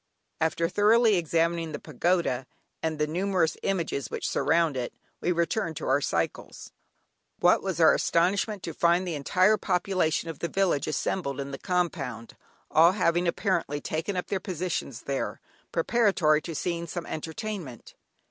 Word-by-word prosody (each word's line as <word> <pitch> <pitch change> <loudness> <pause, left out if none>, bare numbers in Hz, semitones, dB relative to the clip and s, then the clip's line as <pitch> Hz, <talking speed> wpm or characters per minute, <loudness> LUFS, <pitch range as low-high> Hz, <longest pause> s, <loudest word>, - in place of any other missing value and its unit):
After 160 +1 +1
thoroughly 215 +4 +4
examining 165 -1 0
the - - -4
pagoda, 155 -3 0 0.3
and 160 -1 -1
the 150 - +1
numerous 175 0 0
images 170 -8 -1
which - - -3
surround 165 -3 +2
it, 125 -2 -4 0.2
we 180 - 0
returned 170 -1 -1
to - - -5
our 135 +2 +3
cycles. - - -3 0.7
What - - +4
was - - -3
our - - +7
astonishment 195 +3 +1
to 165 - -4
find 175 +3 +2
the 175 - -2
entire 185 +8 +3
population 180 -4 0
of 165 -3 -6
the 170 - -1
village 185 -6 +1
assembled 145 -1 -2
in 140 0 -4
the 135 - -6
compound, 160 - -2 0.4
all 165 +3 +6
having 175 -2 +1
apparently 170 -5 0
taken 165 +6 -3
up 180 - -1
their 195 - -2
positions 175 - -4
there, 140 -1 -3 0.3
preparatory 170 -5 +3
to 165 0 -6
seeing 170 +1 -2
some 175 +1 -5
entertainment. 160 - -6
170 Hz, 150 wpm, -27 LUFS, 155-185 Hz, 0.7 s, our